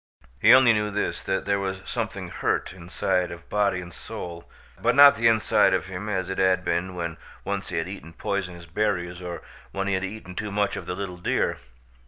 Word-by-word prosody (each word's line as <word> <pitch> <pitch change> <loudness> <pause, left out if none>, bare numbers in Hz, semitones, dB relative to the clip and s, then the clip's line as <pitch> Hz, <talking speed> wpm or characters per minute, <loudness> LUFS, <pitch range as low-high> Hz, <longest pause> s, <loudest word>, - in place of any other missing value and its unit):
He 110 - +6
only 130 -2 +8
knew 105 -1 0
this, 105 0 -2
that 95 0 -2
there 100 0 +1
was 95 -1 -3
something - - -3
hurt - - -1
his 90 - -12
inside 90 +1 0
of 85 -1 -10
body 100 -3 +1
and 90 -1 -10
soul, 85 -1 -8 0.3
but - - +2
not 140 0 +10
the 115 +1 +2
inside 110 -1 +4
of - - -2
him 95 +3 -5
as 95 -3 -1
it 95 - -3
had 95 -1 +3
been 90 +1 -1
when 85 -2 -4 0.3
once - - -3
he - - -3
had 80 +1 -1
eaten 90 -4 -8
poisonous 90 -1 -3
berries 90 -1 -1
or 90 -1 -6 0.3
when 95 0 -2
he 100 - +1
had 95 0 0
eaten 95 -1 -6
too 105 +3 -4
much 100 0 0
of - - -7
the 90 - -2
little 95 -2 -5
deer. 90 - 0
95 Hz, 215 wpm, -25 LUFS, 90-105 Hz, 0.3 s, not